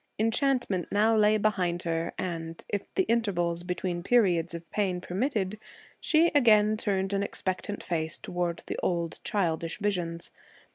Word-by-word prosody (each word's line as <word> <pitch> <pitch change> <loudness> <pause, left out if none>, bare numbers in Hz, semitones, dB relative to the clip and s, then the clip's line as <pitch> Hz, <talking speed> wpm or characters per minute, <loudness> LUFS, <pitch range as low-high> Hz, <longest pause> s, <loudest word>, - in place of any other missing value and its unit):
Enchantment 225 - +1
now 220 +2 +3
lay 215 0 +4
behind 185 -5 0
her, 165 0 -1
and, 165 -2 -5
if 205 -1 -4
the 380 - +3
intervals 180 - 0
between 180 0 -3
periods 175 -6 +2
of 170 0 -8
pain 190 -4 0
permitted, 205 +1 -2 0.4
she 330 +2 +3
again 215 -6 +5
turned 195 -2 -1
an 200 - +1
expectant 200 +1 -3
face 160 -2 -2
toward 175 -1 -3
the - - -4
old 170 -2 -1
childish 170 -5 -1
visions. 175 -5 -2
190 Hz, 140 wpm, -28 LUFS, 170-215 Hz, 0.4 s, again